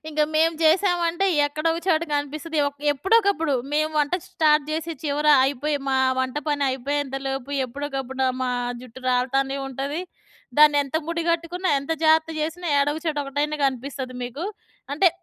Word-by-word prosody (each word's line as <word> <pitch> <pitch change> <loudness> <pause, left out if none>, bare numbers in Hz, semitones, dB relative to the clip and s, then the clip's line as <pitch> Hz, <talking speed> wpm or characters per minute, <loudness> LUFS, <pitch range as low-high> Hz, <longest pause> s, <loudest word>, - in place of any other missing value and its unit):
ఇంక 305 -1 -2
మేము 325 +1 +4
జెసామంటే 345 +1 +2 0.2
ఎక్కడో 305 +3 -2
ఒక 330 - -3
చోట 330 -3 +3
కనిపిస్తది. 305 +3 -3
ఒక్ 285 0 -16
ఎప్పుడో 385 - +2
ఒకప్పుడు 330 -7 0 0.2
మేము 310 +1 +1
వంట 295 +4 +1 0.2
స్టార్ట్ 305 -3 +3
చేసి 325 +1 -2
చివర 300 0 -1 0.2
అయిపోయి 285 +2 0
మా 265 0 +2 0.2
వంట 260 0 -1
పని 290 -1 +1
అయిపోయేంత 270 +1 -2
లోపు 270 0 -4 0.2
ఎప్పుడో 285 +4 -5
ఒకప్పుడు 265 -1 -5
నా 260 - +3 0.2
మా 250 - -1 0.3
జుట్టు 255 +1 -12
రాలతానే 270 +2 +1
ఉంటది. 275 +4 -3 0.6
దాన్ని 300 -1 +7
ఎంత 280 +2 -3
ముడి 335 0 -2
గట్టుకున్నా 335 +2 -1
ఎంత 280 +4 -3
జాగ్రత్త 320 0 +4
చేసినా 325 +3 -3
ఏడొగచోట 295 +2 0
ఒకటైన 290 +2 -2
కనిపిస్తది 265 0 -3
మీకు. 250 +7 -5 0.5
అంటే 360 +6 +5
295 Hz, 160 wpm, -23 LUFS, 270-325 Hz, 0.6 s, దాన్ని